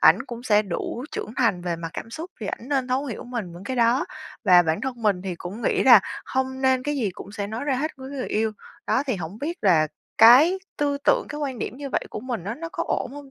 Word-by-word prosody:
ảnh -, -, +6 dB
cũng 240 Hz, 0 st, -7 dB
sẽ 210 Hz, -3 st, +4 dB
đủ 210 Hz, +6 st, -4 dB
trưởng 215 Hz, -, -5 dB
thành 210 Hz, -8 st, +2 dB
về 175 Hz, -2 st, -2 dB
mặt 165 Hz, 0 st, -6 dB
cảm 225 Hz, -, -7 dB
xúc 325 Hz, +8 st, -7 dB
thì 205 Hz, -, -4 dB
ảnh 240 Hz, -, -5 dB
nên 265 Hz, -3 st, 0 dB
thấu 260 Hz, +3 st, 0 dB
hiểu 235 Hz, -, -6 dB
mình 235 Hz, -8 st, -5 dB
vững 175 Hz, +3 st, -10 dB
cái 260 Hz, +2 st, -3 dB
đó 235 Hz, +2 st, +3 dB, 0.4 s
và 180 Hz, -1 st, +7 dB
bản 160 Hz, 0 st, 0 dB
thân 250 Hz, -3 st, -4 dB
mình 195 Hz, -4 st, +2 dB
thì 190 Hz, -2 st, -3 dB
cũng 185 Hz, +7 st, -8 dB
nghĩ -, -, +2 dB
rà -, -, +9 dB, 0.3 s
hông 260 Hz, 0 st, -2 dB
nên 260 Hz, -1 st, +3 dB
cái 295 Hz, +2 st, -2 dB
gì 215 Hz, -7 st, 0 dB
cũng 195 Hz, +2 st, -11 dB
sẽ 200 Hz, -1 st, -3 dB
nói 220 Hz, +5 st, -4 dB
ra 280 Hz, -2 st, +1 dB
hết 310 Hz, +4 st, -1 dB
với 265 Hz, +1 st, -9 dB
người 275 Hz, -3 st, -4 dB
yêu. 220 Hz, 0 st, 0 dB, 0.3 s
Đó 265 Hz, -, +2 dB
thì 255 Hz, -, 0 dB
hổng 175 Hz, +4 st, -6 dB
biết 330 Hz, +6 st, -4 dB
là 165 Hz, -6 st, +5 dB, 0.3 s
cái 270 Hz, +12 st, +8 dB, 0.2 s
tư 285 Hz, -1 st, 0 dB
tưởng, -, -, +3 dB
cái 295 Hz, -, -5 dB
quan 270 Hz, -5 st, -3 dB
điểm 250 Hz, -, -4 dB
như 280 Hz, -1 st, -6 dB
vậy -, -, 0 dB
của -, -, -5 dB
mình 240 Hz, -8 st, -4 dB
á 210 Hz, +4 st, -3 dB
nó 330 Hz, +3 st, -6 dB
có -, -, -2 dB
ổn 250 Hz, -, -1 dB
hông 285 Hz, -2 st, -10 dB
240 Hz, 265 wpm, -24 LUFS, 200-265 Hz, 0.4 s, rà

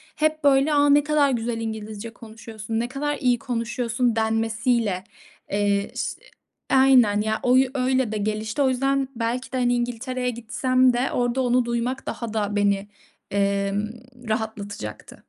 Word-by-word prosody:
hep 310 Hz, 0 st, 0 dB
böyle 280 Hz, +2 st, +4 dB
"A, 290 Hz, 0 st, +4 dB
ne 290 Hz, 0 st, +5 dB
kadar 295 Hz, -2 st, +3 dB
güzel 230 Hz, -1 st, -2 dB
İngilizce 220 Hz, 0 st, -5 dB
konuşuyorsun, 225 Hz, -1 st, -6 dB
ne 240 Hz, -, -1 dB
kadar 290 Hz, +3 st, -2 dB
iyi 245 Hz, -4 st, +2 dB
konuşuyorsun." 235 Hz, -1 st, -1 dB
denmesiyle, 225 Hz, -2 st, 0 dB, 0.5 s
eee, 200 Hz, 0 st, 0 dB
ş -, -, -4 dB, 0.5 s
Aynen 255 Hz, -6 st, +5 dB
ya, 220 Hz, 0 st, -1 dB
o 250 Hz, +1 st, +4 dB
yü 260 Hz, -1 st, +3 dB
öyle 255 Hz, -2 st, +1 dB
de, 215 Hz, -, -2 dB
gelişti 215 Hz, +4 st, -2 dB
o 265 Hz, -, +4 dB
yüzden, 270 Hz, +1 st, +1 dB
belki 235 Hz, +3 st, -2 dB
de 260 Hz, -, -1 dB
İngiltere'ye 245 Hz, +1 st, -1 dB
gitsem 255 Hz, +2 st, +1 dB
de, 245 Hz, +2 st, 0 dB
orada 245 Hz, +1 st, 0 dB
onu 250 Hz, -1 st, +2 dB
duymak 240 Hz, +2 st, -2 dB
daha 230 Hz, -2 st, -5 dB
da 205 Hz, -1 st, -1 dB
beni, 200 Hz, 0 st, +1 dB, 0.4 s
emm, 200 Hz, +1 st, 0 dB, 0.4 s
rahatlatacaktı. 205 Hz, -, -5 dB
235 Hz, 145 wpm, -24 LUFS, 215-255 Hz, 0.5 s, ne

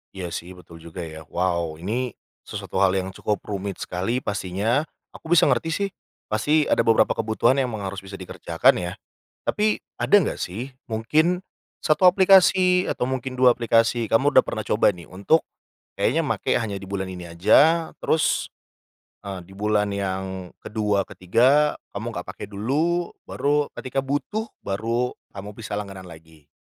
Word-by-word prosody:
Iya 90 Hz, -3 st, -5 dB
sih, 90 Hz, +2 st, -6 dB
betul 85 Hz, -2 st, -14 dB
juga, 85 Hz, +2 st, -8 dB
ya. 80 Hz, -1 st, -9 dB
Wow, 85 Hz, -2 st, -1 dB
ini 120 Hz, +6 st, -2 dB, 0.3 s
sesuatu 95 Hz, -, -4 dB
hal 95 Hz, -1 st, +4 dB
yang 95 Hz, 0 st, -2 dB
cukup 105 Hz, +1 st, -3 dB
rumit 100 Hz, -1 st, -4 dB
sekali 95 Hz, +8 st, -2 dB
pastinya, 105 Hz, -, -1 dB, 0.2 s
aku -, -, -13 dB
bisa 160 Hz, -, +6 dB
ngerti 165 Hz, -, +1 dB
sih, 200 Hz, +4 st, -1 dB, 0.4 s
pasti 150 Hz, +8 st, +3 dB
ada -, -, +2 dB
beberapa 115 Hz, -1 st, +4 dB
kebutuhan 115 Hz, +4 st, +1 dB
yang 130 Hz, -, +1 dB
emang 105 Hz, -, -6 dB
harus 95 Hz, 0 st, -4 dB
bisa 95 Hz, +1 st, -10 dB
dikerjakan 95 Hz, -2 st, +1 dB
ya. 90 Hz, 0 st, -4 dB, 0.5 s
Tapi 215 Hz, 0 st, +1 dB, 0.2 s
ada -, -, 0 dB
enggak 170 Hz, -, -2 dB
sih? 120 Hz, +9 st, -5 dB, 0.2 s
Mungkin 155 Hz, +11 st, +2 dB, 0.4 s
satu 155 Hz, +3 st, +1 dB
aplikasi 185 Hz, -1 st, +5 dB
atau 125 Hz, -, -1 dB
mungkin 130 Hz, 0 st, -4 dB
dua 125 Hz, -1 st, +6 dB
aplikasi 115 Hz, -1 st, +2 dB
kamu 135 Hz, +6 st, +3 dB
udah 130 Hz, -, +8 dB
pernah 110 Hz, -2 st, -5 dB
coba 105 Hz, -, +3 dB
nih 85 Hz, -5 st, -10 dB
untuk 100 Hz, -, +1 dB, 0.5 s
kayaknya -, -, +2 dB
make -, -, 0 dB
hanya 100 Hz, -3 st, -2 dB
di 95 Hz, -, -10 dB
bulan 95 Hz, -1 st, -3 dB
ini 90 Hz, -1 st, -8 dB
aja. 145 Hz, -, +4 dB
Terus, 160 Hz, -, +1 dB, 0.7 s
eee, 100 Hz, -2 st, -6 dB
di 95 Hz, -, -15 dB
bulan 105 Hz, +1 st, +1 dB
yang 95 Hz, -1 st, -3 dB
ke-2 105 Hz, -2 st, -1 dB
ke-3 130 Hz, +11 st, +2 dB, 0.2 s
kamu -, -, -5 dB
nggak -, -, -6 dB
pakai 100 Hz, -, -8 dB
dulu, 150 Hz, +12 st, -1 dB, 0.2 s
baru 145 Hz, 0 st, +1 dB
ketika 130 Hz, +1 st, -2 dB
butuh 205 Hz, +11 st, -2 dB, 0.2 s
baru 115 Hz, +5 st, -1 dB, 0.2 s
kamu 100 Hz, +1 st, -8 dB
bisa 110 Hz, -2 st, -5 dB
langganan 95 Hz, -3 st, -8 dB
lagi. 80 Hz, -2 st, -15 dB
105 Hz, 160 wpm, -24 LUFS, 95-135 Hz, 0.7 s, udah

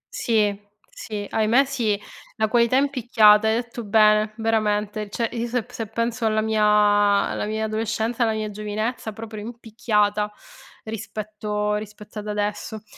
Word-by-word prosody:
Sì, 210 Hz, -4 st, +1 dB, 0.4 s
sì, 210 Hz, -2 st, -6 dB
ahimè 225 Hz, +7 st, +3 dB
sì, 230 Hz, -7 st, -1 dB, 0.4 s
la 220 Hz, -1 st, +1 dB
qualità 235 Hz, +2 st, +3 dB
è 270 Hz, -, +4 dB
in 285 Hz, 0 st, 0 dB
picchiata. 220 Hz, -4 st, +5 dB
Hai 220 Hz, -, +3 dB
detto 235 Hz, 0 st, -4 dB
bene, 215 Hz, 0 st, +4 dB
veramente, 215 Hz, -1 st, 0 dB
cioè 230 Hz, +2 st, -1 dB
io 235 Hz, 0 st, -3 dB
se 245 Hz, 0 st, -1 dB
p -, -, -20 dB
se 225 Hz, -2 st, -5 dB
penso 230 Hz, +1 st, -1 dB
alla 215 Hz, 0 st, +1 dB
mia 220 Hz, -1 st, +1 dB
alla 205 Hz, -1 st, +3 dB
mia 220 Hz, +1 st, -2 dB
adolescenza, 220 Hz, +2 st, -2 dB
alla 225 Hz, -2 st, +3 dB
mia 215 Hz, -1 st, -3 dB
giovinezza, 215 Hz, +2 st, -3 dB
proprio 220 Hz, -1 st, -8 dB
in 230 Hz, +2 st, -8 dB
picchiata 210 Hz, -2 st, 0 dB, 0.5 s
rispetto 210 Hz, -1 st, -4 dB
rispetto 210 Hz, 0 st, -9 dB
ad 210 Hz, -, -8 dB
adesso. 210 Hz, +1 st, -3 dB
215 Hz, 155 wpm, -23 LUFS, 210-225 Hz, 0.5 s, picchiata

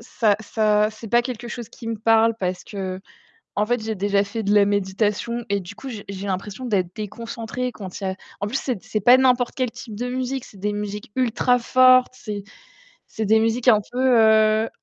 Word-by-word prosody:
ça 225 Hz, -3 st, +1 dB
ça 215 Hz, -1 st, +2 dB
c'est 220 Hz, +1 st, -10 dB
pas 240 Hz, +3 st, +4 dB
quelque 240 Hz, -1 st, -6 dB
chose 235 Hz, -2 st, -7 dB
qui 230 Hz, -, -12 dB
me 225 Hz, -, -2 dB
parle 225 Hz, +1 st, +3 dB
parce 180 Hz, -2 st, -3 dB
qu'en 195 Hz, -, -7 dB, 0.5 s
fait, 245 Hz, 0 st, 0 dB
j'ai 220 Hz, 0 st, -3 dB
déjà 200 Hz, 0 st, +1 dB
fait 220 Hz, +3 st, -5 dB
de 205 Hz, 0 st, +1 dB
la 205 Hz, -1 st, +6 dB
méditation 205 Hz, +4 st, -1 dB
et 200 Hz, 0 st, 0 dB
du 175 Hz, -, -10 dB
coup, 270 Hz, -, -9 dB
j'ai 220 Hz, -5 st, -7 dB
j'ai 195 Hz, 0 st, -6 dB
l'impression 195 Hz, +5 st, -4 dB
d'être 185 Hz, -6 st, 0 dB
déconcentrée 230 Hz, +3 st, -5 dB
quand 195 Hz, -4 st, -8 dB
il -, -, -5 dB
y -, -, 0 dB
a 190 Hz, -, -2 dB, 0.3 s
en 200 Hz, -, -1 dB
plus, 225 Hz, +6 st, -2 dB
c'est 245 Hz, -8 st, -3 dB
c'est 215 Hz, -, -3 dB
pas 245 Hz, +5 st, +7 dB
n'importe 250 Hz, -2 st, +2 dB
quel 255 Hz, -3 st, 0 dB
type 225 Hz, -1 st, -10 dB
de 245 Hz, +3 st, -3 dB
musique, 255 Hz, +1 st, -3 dB
c'est 200 Hz, -, -15 dB
des 210 Hz, +1 st, -1 dB
musiques 205 Hz, 0 st, -5 dB
ultra 250 Hz, 0 st, +2 dB
fortes, 255 Hz, +1 st, +5 dB
c'est 210 Hz, -5 st, -6 dB, 0.6 s
c'est 220 Hz, -, -4 dB
des 220 Hz, +2 st, +4 dB
musiques 225 Hz, +3 st, 0 dB
un 215 Hz, -4 st, +7 dB
peu, 255 Hz, -1 st, +3 dB
heu 220 Hz, 0 st, +4 dB
220 Hz, 210 wpm, -22 LUFS, 205-245 Hz, 0.6 s, pas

